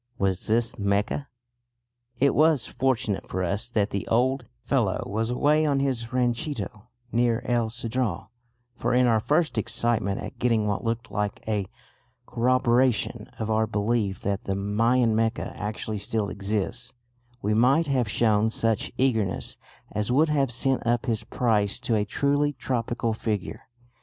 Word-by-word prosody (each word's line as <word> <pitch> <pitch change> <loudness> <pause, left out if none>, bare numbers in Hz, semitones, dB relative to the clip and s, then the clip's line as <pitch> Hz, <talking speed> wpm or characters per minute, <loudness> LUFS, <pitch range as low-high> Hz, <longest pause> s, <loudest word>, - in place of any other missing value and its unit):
Was 95 -2 -1
this 115 +2 0
Mecca? 100 +7 0 0.9
It 140 +3 +3
was 155 -3 +4
fortunate 125 -6 -1
for 95 - -2
us 100 +7 -1
that 105 -3 0
the 100 - -3
old 130 +2 +1 0.2
fellow - - +1
was 110 +3 -2
away 150 +5 +3
on 145 -3 +2
his 130 -3 -1
ranchito 120 - -2 0.2
near 120 0 +1
El 120 -2 +1
Cedral, 115 -5 -3 0.5
for 120 +1 0
in 125 0 +5
our 115 -2 +4
first 150 0 +1
excitement 110 -3 0
at - - -8
getting 115 -3 +2
what 100 -1 -1
looked 115 0 -3
like 105 -1 -2
a 105 -3 -1 0.6
corroboration 125 0 +1
of 110 0 -2
our 110 0 +2
belief 105 -2 0
that 100 0 -2
the 95 - -1
Mayan 115 +4 +2
Mecca 115 +1 0
actually 105 0 -4
still 105 0 -2
exists, 105 +5 -3 0.5
we 105 +2 +1
might 130 +9 +4
have 130 -6 0
shown 110 -1 +2
such 115 -1 0
eagerness 110 -8 0 0.4
as 105 +3 -1
would 155 +5 +4
have 140 -4 +1
sent 130 +3 +1
up 120 +1 +1
his 115 -3 -1
price 110 -2 0
to 125 -2 -1
a 105 -1 +2
truly 145 +6 +1
tropical 120 -3 -2
figure. 110 -2 -4
115 Hz, 150 wpm, -26 LUFS, 105-125 Hz, 0.9 s, in